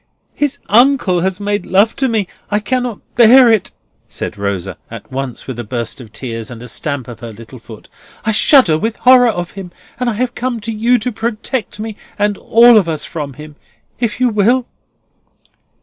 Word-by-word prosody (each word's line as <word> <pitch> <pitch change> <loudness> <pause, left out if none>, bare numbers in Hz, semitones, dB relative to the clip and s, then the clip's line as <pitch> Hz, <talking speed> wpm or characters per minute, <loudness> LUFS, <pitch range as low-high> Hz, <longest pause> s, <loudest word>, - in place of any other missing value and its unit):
"His 285 -1 -1
uncle 235 -5 +3
has 190 +2 -1
made 205 0 -2
love 200 +4 +3
to 265 - +1
me. 220 -5 0 0.2
I 205 - +1
cannot 245 +1 -2
bear 245 +2 +7
it," 220 -4 +1 0.4
said - - -5
Rosa, 100 -3 -4
at - - -10
once 130 -2 -5
with 130 -3 -6
a - - -3
burst 120 +3 -5
of 110 -4 -13
tears, 115 -2 -6
and 120 - -9
a - - -9
stamp 140 +1 -4
of 120 -2 -9
her 115 -1 -8
little 115 +4 -12
foot; 110 -2 -13 0.4
"I 220 - +2
shudder 215 - +5
with 225 +3 -2
horror 250 -1 +5
of 175 -6 -3
him, 190 -1 -9 0.3
and 250 -1 0
I - - -1
have 245 +3 -2
come 250 -2 -3
to 225 +2 -4
you 230 +3 +2
to 245 +2 -3
protect 225 +1 -4
me 215 -1 -6 0.2
and 205 0 +1
all 235 0 +6
of 185 -5 +2
us 155 -2 -2
from 145 -4 -6
him, 150 +1 -12 0.4
if 230 -1 -2
you 255 -1 +3
will?" 230 +4 +2
205 Hz, 195 wpm, -16 LUFS, -, 0.4 s, bear